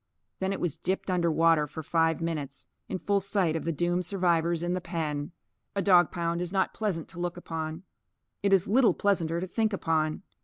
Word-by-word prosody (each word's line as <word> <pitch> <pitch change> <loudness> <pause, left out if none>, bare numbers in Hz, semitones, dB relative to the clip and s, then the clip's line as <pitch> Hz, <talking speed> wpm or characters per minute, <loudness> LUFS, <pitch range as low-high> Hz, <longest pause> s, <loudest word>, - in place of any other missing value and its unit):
Then 190 0 0
it 195 - -2
was 175 -5 -2
dipped 190 0 -1
under 170 -2 +2
water 165 -1 +4
for 160 +3 -7
five 165 +1 +1
minutes, 150 -5 -3 0.2
in 190 - -2
full 200 +2 +1
sight 190 -4 0
of 160 - -3
the 165 - +1
doomed 175 +3 0
survivors 170 -3 +1
in 175 +1 0
the 185 - -2
pen. 155 -4 -3 0.4
A 200 - +1
dog 175 -4 +6
pound 170 0 -1
is 180 -1 -3
not 190 -1 +1
pleasant 195 -7 -2
to 175 - -10
look 175 0 -2
upon. 160 0 -5 0.6
It 200 - +1
is 190 -2 +4
little 240 +3 +4
pleasanter 170 -5 +1
to 180 - -2
think 220 +3 0
upon. 160 -2 0
175 Hz, 200 wpm, -28 LUFS, 165-190 Hz, 0.6 s, dog